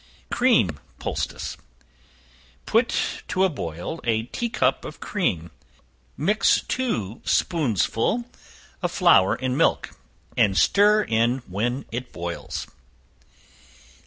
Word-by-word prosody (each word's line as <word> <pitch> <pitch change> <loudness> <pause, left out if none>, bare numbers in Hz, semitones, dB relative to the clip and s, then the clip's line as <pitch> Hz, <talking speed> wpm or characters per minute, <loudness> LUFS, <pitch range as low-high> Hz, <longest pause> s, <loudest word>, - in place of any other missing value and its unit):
Cream 160 - +3 0.2
Poultice. - - -4 1.1
Put - - +1
to 190 +1 +2
boil 90 - -5
a 110 -1 +1
tea 235 - -3
cup - - +1
of - - -8
cream; 85 - -2 0.7
mix 205 +9 +3
two 120 - -2
spoonsful 150 - +1 0.6
of - - -1
flour 95 +1 +5
in 130 0 -2
milk, 165 - +2 0.4
and 95 -2 +3
stir 210 +1 +5
in 120 - +1
when 120 +8 -2
it 120 +2 -5
boils. 85 0 -5
125 Hz, 100 wpm, -24 LUFS, -, 1.1 s, flour